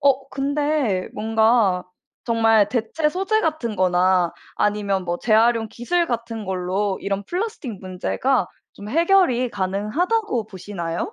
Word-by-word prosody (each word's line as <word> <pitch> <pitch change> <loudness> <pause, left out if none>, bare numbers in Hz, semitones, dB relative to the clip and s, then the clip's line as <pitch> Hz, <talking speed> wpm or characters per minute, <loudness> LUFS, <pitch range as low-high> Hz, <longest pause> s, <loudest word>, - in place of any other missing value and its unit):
어 275 -1 +2
근데 280 -7 0
뭔가 220 -3 +2 0.4
정말 225 -3 +3
대체 250 +7 0
소재 390 +6 0
같은 310 - -2
거나 180 -1 +2 0.2
아니면 200 -2 0
뭐 175 -1 -1
재활용 225 0 +3
기술 340 +11 -1
같은 230 -2 -4
걸로 190 +1 -1
이런 200 0 -2
플라스틱 355 - -4
문제가 190 +8 -1 0.3
좀 200 - -10
해결이 330 - +3
가능하다고 215 - -1
보시나요? 180 -4 -5
225 Hz, 270 characters per minute, -22 LUFS, 195-275 Hz, 0.4 s, 정말